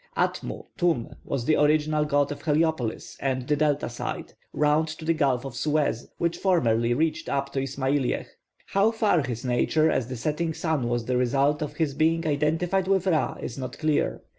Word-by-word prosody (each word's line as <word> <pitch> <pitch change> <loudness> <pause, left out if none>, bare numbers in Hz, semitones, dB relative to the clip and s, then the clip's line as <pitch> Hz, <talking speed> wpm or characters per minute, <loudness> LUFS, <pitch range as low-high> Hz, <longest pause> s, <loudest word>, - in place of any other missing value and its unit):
+Atmu+ - - -2
(Tum) 170 -10 +1
was 130 -4 -3
the 155 - +3
original 150 0 +2
god 145 -1 +1
of 145 - -6
Heliopolis 155 -6 -1
and 130 -2 -2
the 150 - +2
Delta 145 -1 +1
side, 120 - -5 0.2
round 150 +1 +2
to 155 +1 -7
the 165 - +3
gulf 135 -5 +1
of 135 -3 -6
Suez, 145 -3 0
which 170 0 -1
formerly 120 - +2
reached 160 +2 -1
up 140 0 -1
to 135 - 0
Ismailiyeh. 135 0 -1 0.4
How 200 +3 +3
far 220 -7 +2
his 120 -3 -4
nature 155 +6 +2
as 120 - 0
the 130 -1 -5
setting 155 +5 -1
sun 160 -7 -1
was 120 -1 -1
the 125 +1 0
result 135 +4 +2
of 150 - -4
his 155 -4 0
being 165 +2 +1
identified 160 +6 +1
with 190 -1 +2
Ra, 165 -5 +1
is 120 - -6
not 130 -1 -6
clear. 155 -2 0
150 Hz, 185 wpm, -26 LUFS, 130-160 Hz, 0.4 s, the